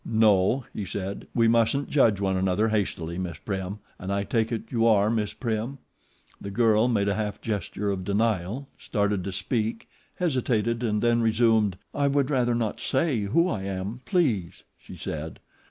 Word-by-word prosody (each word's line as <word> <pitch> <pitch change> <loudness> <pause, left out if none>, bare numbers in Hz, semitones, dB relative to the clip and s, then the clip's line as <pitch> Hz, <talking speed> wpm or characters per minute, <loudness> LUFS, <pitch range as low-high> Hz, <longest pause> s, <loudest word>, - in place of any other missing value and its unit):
"No," 110 +2 +3
he 105 - -4
said, 95 +1 -5
"we 115 -1 +4
mustn't 115 +5 +2
judge 115 -9 +4
one 95 -1 0
another 95 +4 +1
hastily, 90 -5 -2
Miss 85 -4 -4
Prim, 95 +2 -4 0.2
and 95 +1 -4
I 100 0 0
take 110 +2 0
it 115 -2 -2
you 115 -1 +2
are 105 -1 +4
Miss 110 -3 0
Prim?" 115 +3 -3 0.6
The 100 - -5
girl 110 +1 +3
made 105 -5 +1
a 100 - +2
half 105 -1 -3
gesture 105 -1 -2
of 95 -1 -3
denial, 105 +4 0
started 100 -3 0
to 100 - -3
speak, 110 +4 -2 0.3
hesitated 120 - 0
and 105 -3 0
then 120 0 +3
resumed. 110 -4 +3 0.2
"I 140 0 +1
would 140 0 +1
rather 120 -3 +2
not 115 -3 -1
say 135 -2 +1
who 165 - +3
I 110 - -2
am, 100 +5 -4
please," 120 - 0
she - - -12
said. 80 +1 -5
110 Hz, 170 wpm, -26 LUFS, 100-120 Hz, 0.6 s, we